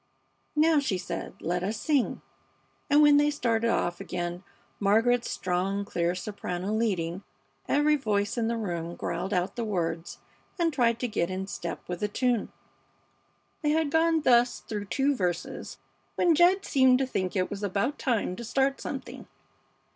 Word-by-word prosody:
"Now," 310 0 +4
she 240 -9 -1
said, 180 - -5
"let 175 +1 -1
us 210 +4 -2
sing," 285 -6 0 0.7
and 295 +1 +6
when 295 -1 +7
they 295 0 +4
started 235 -5 0
off 175 -5 0
again 175 0 -4 0.4
Margaret's 225 +4 +3
strong, 190 +2 -1
clear 175 -2 -1
soprano 185 0 -4
leading, 190 -6 -1 0.5
every 300 +1 +3
voice 205 -6 0
in 230 -2 0
the 230 0 -1
room 170 -5 -4
growled 195 - -3
out 185 +1 0
the 235 - -2
words 170 -5 -2 0.4
and 335 -3 +1
tried 235 -3 +2
to 250 - 0
get 180 -6 -1
in 185 +1 -3
step 175 -3 -6
with 180 -1 -4
the 210 - 0
tune. 245 +1 0 1.1
They 300 - +1
had 310 -1 +1
gone 325 0 +3
thus 245 -3 +3
through 210 -2 -5
two 275 +7 +1
verses 180 -5 -3 0.4
when 345 -2 +4
Jed 360 +5 +4
seemed 260 -2 +4
to 270 - 0
think 185 -8 -2
it 185 -1 0
was 200 0 -5
about 205 +8 -1
time 225 -8 0
to 235 - -6
start 270 +4 0
something. - - -6
220 Hz, 160 wpm, -28 LUFS, 185-275 Hz, 1.1 s, when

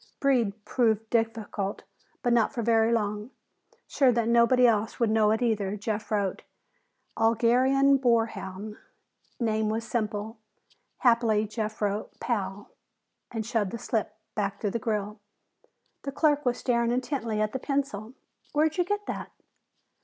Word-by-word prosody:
"Breed" 230 -7 +1
proved 225 -3 +1
difficult, 225 -3 -1 0.4
but 245 - +2
not 230 -2 +3
for 240 -4 -3
very 225 0 +3
long. 210 0 -1 0.6
Sure 265 -3 +3
that 230 -1 0
nobody 235 +2 +5
else 220 -2 +1
would 230 -3 +2
know 220 -1 +4
it 220 +3 +1
either, 210 -4 0
Jeff 215 +1 -3
wrote 200 -3 -1 0.8
"Algerian 255 +5 +4
boar 235 -4 +3
hound." 210 0 -7 0.6
"Name" 220 -2 +1
was 225 +1 -2
simple. 215 -1 -3 0.6
Happily 230 -3 +3
Jeff 215 0 -4
wrote 205 +1 -2
"Pal" 200 -3 -3 0.6
and 225 -3 -4
shoved 225 -4 0
the 235 - -5
slip 225 -1 -2 0.2
back 200 -2 -2
through 205 - -1
the 235 - -2
grill. 210 -2 -2 0.8
The 275 - -4
clerk 295 -1 +2
was 245 - +1
staring 235 -2 +1
intently 240 -3 -1
at 215 0 +1
the 265 - -2
pencil. 260 -6 -2 0.4
"Where'd 310 +3 +2
you - - +5
get 410 +3 -2
that?" - - -5
225 Hz, 145 wpm, -27 LUFS, 210-245 Hz, 0.8 s, nobody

